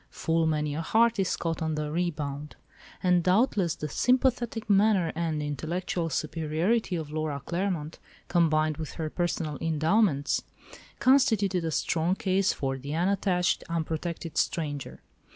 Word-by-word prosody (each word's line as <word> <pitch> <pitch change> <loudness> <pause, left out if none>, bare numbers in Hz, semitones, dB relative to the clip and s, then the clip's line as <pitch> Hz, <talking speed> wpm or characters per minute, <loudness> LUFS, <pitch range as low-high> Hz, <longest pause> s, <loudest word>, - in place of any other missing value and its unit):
"Full 165 0 0
many 150 -2 0
a 155 - -2
heart 225 +5 +3
is 190 - +1
caught 165 -1 -3
on 160 -1 -1
the 150 -1 -3
rebound," 150 -4 -3 0.5
and 180 -1 +4
doubtless 185 -2 +2
the 150 - -4
sympathetic 245 - +1
manner 200 -4 +3
and 160 -2 -2
intellectual 165 +4 -2
superiority 160 - 0
of 155 -3 -5
Laura 155 -2 -2
Claremont, 170 -3 -2 0.3
combined 155 -3 +2
with 155 -2 -6
her 155 -2 -4
personal 165 -4 -2
endowments, 160 0 +1 0.5
constituted 220 -9 +3
a 165 - -1
strong 165 +3 0
case 195 0 +1
for 135 -1 -3
the 140 +3 -5
unattached, 180 0 +1
unprotected 165 0 -3
stranger. 145 -4 -2
165 Hz, 135 wpm, -28 LUFS, 155-190 Hz, 0.5 s, and